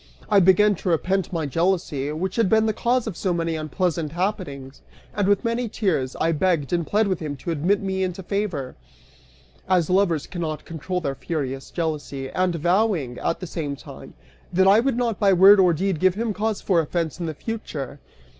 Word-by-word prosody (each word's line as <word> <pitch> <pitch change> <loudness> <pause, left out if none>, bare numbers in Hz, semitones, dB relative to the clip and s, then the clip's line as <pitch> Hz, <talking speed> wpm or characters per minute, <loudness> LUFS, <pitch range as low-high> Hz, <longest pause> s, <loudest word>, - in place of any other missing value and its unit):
I 205 - +7
began 195 +3 +5
to 180 - -3
repent 185 +2 0
my 165 -3 -2
jealousy, 165 -2 0
which 185 +5 -3
had 225 -5 +3
been 220 0 +4
the 220 - +1
cause 245 +3 0
of 220 -6 -4
so 185 - -1
many 165 -1 -1
unpleasant 160 0 -2
happenings) 150 -8 -4 0.3
and 205 -2 0
with 205 +3 +2
many 230 0 -1
tears, 165 - -1
I 165 - +1
begged 165 -2 0
and 170 -2 0
pled 215 +1 +2
with 185 -3 -1
him 150 -3 -4
to 155 +5 -5
admit 175 +6 +1
me 190 -1 -2
into 185 0 -3
favor, 180 -10 -3 0.9
as 180 -3 +2
lovers 180 -5 +2
cannot 160 -4 -5
control 180 +3 -4
their 140 -4 -2
furious 135 -3 -4
jealousy, 150 -5 -4
and 185 -1 0
vowing, 175 - +1
at 165 - -2
the - - -4
same 155 -5 -4
time, - - -12 0.4
that 190 +2 +3
I 200 +3 +7
would 250 0 0
not 235 -4 -1
by 200 -2 +4
word 195 +3 +8
or 180 -2 +5
deed 180 +1 -1
give 185 +1 +3
him 225 0 -1
cause 215 +1 -2
for 180 -4 +2
offense 165 +1 -2
in 170 - -3
the 155 - -4
future. 145 - -6
180 Hz, 195 wpm, -23 LUFS, 155-200 Hz, 0.9 s, word